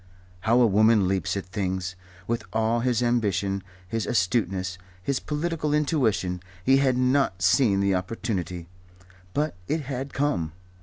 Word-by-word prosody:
How 115 +6 +3
a 125 - +6
woman 110 -1 +4
leaps 95 0 0
at 100 - -4
things! 90 -1 -3 0.3
With 115 +2 -2
all 110 +1 +1
his 125 0 +1
ambition, 100 -5 +1 0.3
his 115 +3 -2
astuteness, 95 -4 0 0.2
his 135 +6 0
political 150 -1 -1
intuition, 115 - +1 0.2
he 135 +1 +6
had 130 -2 +2
not 125 -8 +2
seen 100 +1 +4
the 100 -1 +2
opportunity. 90 -3 -3 0.7
But 150 +2 +1
it 160 - 0
had 135 0 -4
come. 135 - -1
110 Hz, 140 wpm, -26 LUFS, 95-130 Hz, 0.7 s, a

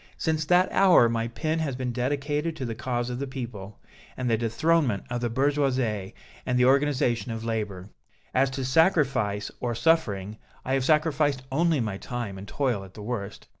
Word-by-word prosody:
Since 155 -2 0
that 180 +3 +3
hour 185 -11 +6
my 115 0 -1
pen 155 +7 -2
has 145 -5 -2
been 125 -1 -3
dedicated 145 +5 -1
to 135 - -4
the 115 - -3
cause 120 +1 -2
of 125 - -4
the 140 - -3
people, 115 -7 -7 0.4
the 125 -3 +1
dethronement 120 - +1
of 120 0 -2
the 120 - 0
Bourgeoisie 130 -6 0 0.3
and 125 - 0
the 125 - +4
organization 130 -3 +2
of 115 0 -5
labor. 105 -4 -4 0.4
As 135 +1 +3
to 130 0 -4
sacrifice 130 - +2
or 120 -1 -2
suffering, 110 - +1 0.3
I 130 - -1
have 135 -1 +1
sacrificed 150 -3 +2
only 160 +2 +2
my 105 -4 -2
time 120 -6 -5
and 100 - -9
toil 125 -5 -1
at 95 -1 -14
the 105 - -8
worst. 105 -3 -5
125 Hz, 175 wpm, -26 LUFS, 115-145 Hz, 0.4 s, hour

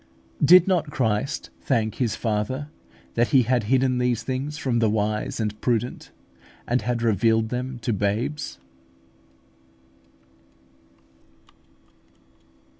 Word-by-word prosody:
Did 180 +4 +7
not 180 -5 +1
Christ 130 +1 -1
thank 110 -5 0
His 115 -3 +1
Father 120 +6 -2 0.4
that 120 +1 +2
He 130 -3 +4
had 120 -1 +1
hidden 130 +1 +2
these 125 -2 0
things 135 +4 -3
from 130 -5 0
the 110 -2 +3
wise 105 +1 -1
and 105 -1 -3
prudent, 120 0 -1 0.6
and 125 +2 +1
had 120 +1 -2
revealed 110 +1 +2
them 125 +1 -4
to 120 - 0
babes? 110 - -2
120 Hz, 110 wpm, -24 LUFS, 110-130 Hz, 0.6 s, Did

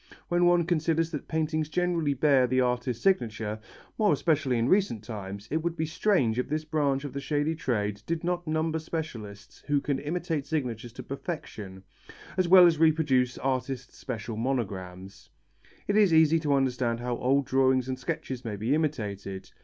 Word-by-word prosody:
When 175 0 +3
one 175 0 +4
considers 165 -1 0
that 150 - -5
paintings 155 -1 -1
generally 170 -4 0
bear 135 -2 +4
the 130 +1 +1
artist's 125 -1 -1
signature, 110 - 0 0.4
more 210 -4 +4
especially 145 -4 +1
in 115 +1 +1
recent 185 - +2
times, 100 -2 -7
it 155 - +2
would 170 0 -2
be 160 - 0
strange 155 - +1
if 125 - -2
this 155 +1 -2
branch 145 -3 0
of 145 - -6
the 140 - -3
shady 145 +3 0
trade 105 -9 -2
did 165 0 -2
not 175 -1 -2
number 160 +1 0
specialists 120 -11 -7
who 145 -1 +2
can 140 -1 -2
imitate 160 -1 -3
signatures 120 -7 -3
to - - -8
perfection, 120 - -6 0.5
as 185 -2 +1
well 180 0 +9
as 165 -3 +3
reproduce 150 -6 +3
artists' 130 -1 -3
special 110 -3 -5
monograms. 95 -7 -4 0.6
It 205 - +1
is 210 -4 +5
easy 160 0 +5
to 150 -3 0
understand 125 -3 0
how 120 0 -2
old 135 +2 +2
drawings 130 -1 +2
and 130 -1 -3
sketches 130 0 -4
may 110 -4 -4
be 110 +7 0
imitated. 105 -11 -3
140 Hz, 170 wpm, -28 LUFS, 120-160 Hz, 0.6 s, well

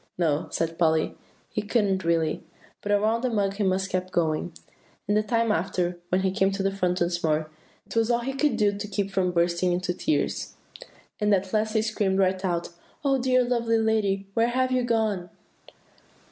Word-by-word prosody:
"No," 160 -4 +1
said 165 0 -2
Polly, 160 -2 +2 0.4
"he 215 - -1
couldn't 205 -3 +1
really, 165 -2 0 0.4
but 205 - -3
around 215 +3 +2
the 255 - 0
mug 200 -4 0
he 210 - 0
must 190 0 0
keep 185 0 -1
going. 165 -1 0 0.6
And 205 - +2
the 215 - +4
time 230 0 +1
after, 180 -2 -1
when 185 +1 +2
he 190 0 +1
came 195 0 +2
to 195 0 -2
the 195 - +1
front 180 -2 -1
once 175 0 0
more, 155 -1 0 0.3
it - - -10
was 225 0 +2
all 240 0 +2
he 270 +3 -3
could 295 +2 +1
do 205 -2 +2
to 205 +1 -5
keep 200 -1 -2
from 185 -2 +1
bursting 170 +1 +1
into 180 0 -1
tears. 310 - -1 0.6
And 210 0 +2
at 190 0 -3
last 215 0 +1
he 220 -1 +2
screamed 205 -3 0
right 190 0 +1
out, 175 -2 -1 0.4
'Oh, 270 -1 +3
dear, 255 0 +3
lovely 235 -2 +1
lady! 215 -3 +1
where 230 +2 +3
have 255 +1 +1
you 255 0 +2
gone? 220 -7 0
195 Hz, 195 wpm, -26 LUFS, 180-220 Hz, 0.6 s, the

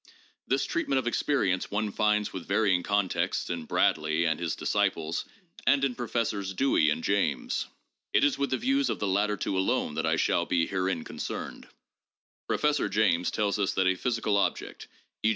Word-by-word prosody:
This 135 +1 +1
treatment 140 -5 -1
of 130 - 0
experience 120 -7 0
one 105 0 -1
finds 105 0 +1
with 95 - -7
varying 100 -2 +2
contexts 100 -1 0
in 85 -2 -4
Bradley 80 +2 +1
and 80 -2 0
his 85 -1 -2
desciples 80 +2 -1 0.4
and 140 -1 +4
in 135 -2 +1
Professors 110 -5 -2
Dewey 110 - +3
and 80 +2 -1
James. 85 -10 0 0.4
It - - +3
is 145 - +3
with 140 0 -1
the 130 - 0
views 270 +3 +1
of - - -1
the - - -2
latter 105 +2 +1
two 95 - -2
alone 95 0 0
that - - -1
I - - +2
shall - - +1
be 85 -1 +2
herein 95 -3 -1
concerned. - - -6 0.8
Professor 150 -1 +1
James 95 -4 +2
tells 105 -1 -1
us 100 - +1
that 95 - +1
a 95 - +4
physical 110 0 0
object, 100 - -2 0.3
e. 110 - +3
100 Hz, 175 wpm, -28 LUFS, 90-120 Hz, 0.8 s, and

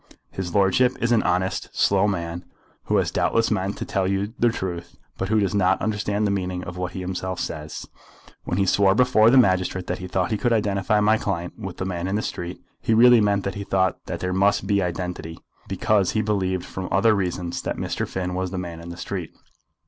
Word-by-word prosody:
"His 90 -3 -5
lordship 100 +6 +3
is 120 - 0
an 115 - +4
honest, 95 +1 -1
slow 100 +1 +3
man, 85 -3 -3 0.4
who - - +2
has - - +1
doubtless 115 0 +1
meant 100 -1 -1
to - - -4
tell 95 -2 0
you 100 +3 -1
the 120 - +4
truth, 85 -6 -5 0.2
but 95 - -2
who 110 0 +3
does 100 -2 0
not 95 -2 +3
understand 105 -1 -1
the 100 - +1
meaning 90 -2 -2
of 90 - -7
what 90 0 -4
he 95 - -5
himself 95 0 -4
says. 75 -1 -5 0.6
When 90 - -2
he 100 - +2
swore 95 +1 +4
before 120 -2 +5
the 135 - +5
magistrate 95 -5 +2
that - - -3
he 90 - -6
thought 90 +1 -1
he 110 - 0
could 120 -1 +2
identify 105 -1 +1
my 110 +1 +3
client 90 -3 -3
with 95 -4 -6
the 95 - -3
man 90 -1 -3
in 95 - -1
the 105 - -1
street, 90 0 -5 0.2
he 115 - +2
really 120 0 +7
meant 100 -1 +2
that 100 - -2
he 100 - -5
thought 95 -2 0
that - - -4
there 90 0 -1
must 100 +2 +2
be 100 0 +2
identity, 90 -2 -4 0.3
because 100 -1 +1
he 110 - +1
believed 95 -4 -1
from 95 -1 -6
other 110 +3 +4
reasons 90 -3 -2
that - - -3
Mr. - - -2
Finn 90 -1 -3
was 95 0 -2
the 95 - -5
man 85 -2 -5
in 85 +1 -9
the 85 - -8
street. 90 -2 -4
95 Hz, 225 wpm, -23 LUFS, 90-105 Hz, 0.6 s, really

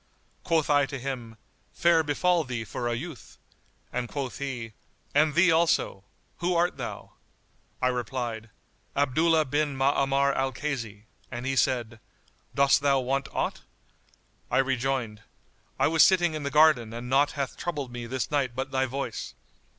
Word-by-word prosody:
Quoth 165 -3 +1
I 145 -2 +3
to 140 - -5
him, 125 -4 -6 0.4
"Fair 170 -1 +4
befal 165 +3 +1
thee 125 -4 -4
for 120 +1 -4
a 120 - 0
youth!"; 150 +2 -8 0.6
and 125 -1 -2
quoth 135 -3 -4
he, 125 -5 -5 0.4
"And 150 +1 +3
thee 175 0 +5
also! 160 - +1 0.3
Who 175 0 0
art 175 +1 +1
thou?" - - -6 0.7
I 125 - +4
replied, 120 -2 -3 0.5
"Abdullah 155 +3 +3
bin 145 +1 -1
Ma'amar 140 0 +2
al 135 0 -1
Kaysi;" 120 -7 -4 0.3
and 120 0 -6
he 135 0 0
said, 120 -3 0 0.6
"Dost 140 0 +4
thou 140 -1 +3
want 135 +1 -1
aught?" - - -2 0.9
I - - +1
rejoined, 130 -4 0 0.6
"I - - +3
was 160 +1 +3
sitting 175 -3 +5
in 155 - -4
the 140 - -2
garden 145 -6 +4
and 120 +1 -6
naught 140 +3 +3
hath 140 -3 -3
troubled 145 -7 -4
me 120 -1 -6
this 130 +3 -3
night 135 -5 0
but 135 +1 -3
thy 130 -1 +1
voice. 130 -3 -5
135 Hz, 155 wpm, -27 LUFS, 125-150 Hz, 0.9 s, thee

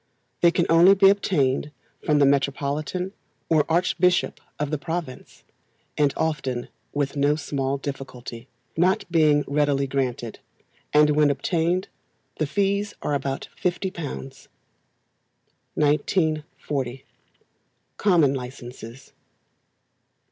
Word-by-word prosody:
They 170 - +7
can 170 0 +1
only 175 +4 +7
be 195 0 +6
obtained 150 -9 0 0.3
from 150 - +2
the 145 - +5
Metropolitan 140 +6 0 0.4
or 155 -2 +3
archbishop 180 +1 +2 0.2
of 150 0 -2
the 155 - -1
province, 160 -4 -6 0.5
and 145 -2 +3
often 135 -6 -2 0.2
with 145 -1 -2
no 145 +1 +2
small 140 -2 -2
difficulty, 130 -3 -7 0.3
not 185 +3 +2
being 155 -3 +4
readily 145 -1 +1
granted; 125 -4 -3 0.5
and 150 0 +5
when 150 0 +4
obtained 170 +5 0 0.5
the 155 - +1
fees 200 +5 0
are 150 - -1
about 140 -1 -2 0.2
£50. 185 +2 -1 1.8
1940. 150 -4 -1 0.9
Common 165 -9 +4
Licences. 125 -1 -8
150 Hz, 100 wpm, -24 LUFS, 135-170 Hz, 1.8 s, They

